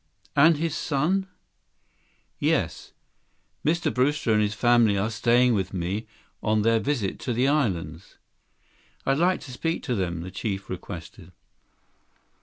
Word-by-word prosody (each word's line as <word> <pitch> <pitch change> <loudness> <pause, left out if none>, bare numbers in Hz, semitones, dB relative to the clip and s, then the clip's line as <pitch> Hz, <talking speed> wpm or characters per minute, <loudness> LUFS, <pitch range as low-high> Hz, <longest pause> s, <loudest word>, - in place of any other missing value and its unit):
"And 155 +2 +6
his 160 0 -1
son?" 165 +8 0 1.1
62 - - -3
"Yes, - - -1 0.7
Mr. 170 +3 +1
Brewster 130 -2 +1
and 105 - +3
his 105 0 0
family 120 -3 +4
are 105 +4 0
staying 120 +3 +3
with 95 -2 -2
me 95 +5 -3 0.3
on 105 0 +1
their 115 0 +3
visit 110 -4 -2
to 125 - -2
the 125 +3 +2
islands." 90 - -1 0.9
"I'd 135 +2 +2
like 180 +2 +2
to 130 - -9
speak 165 +6 -2
to 125 - -1
them," 90 -6 -2
the 90 +2 -7
chief 95 0 -4
requested. 90 0 -8
115 Hz, 140 wpm, -25 LUFS, 95-140 Hz, 1.1 s, And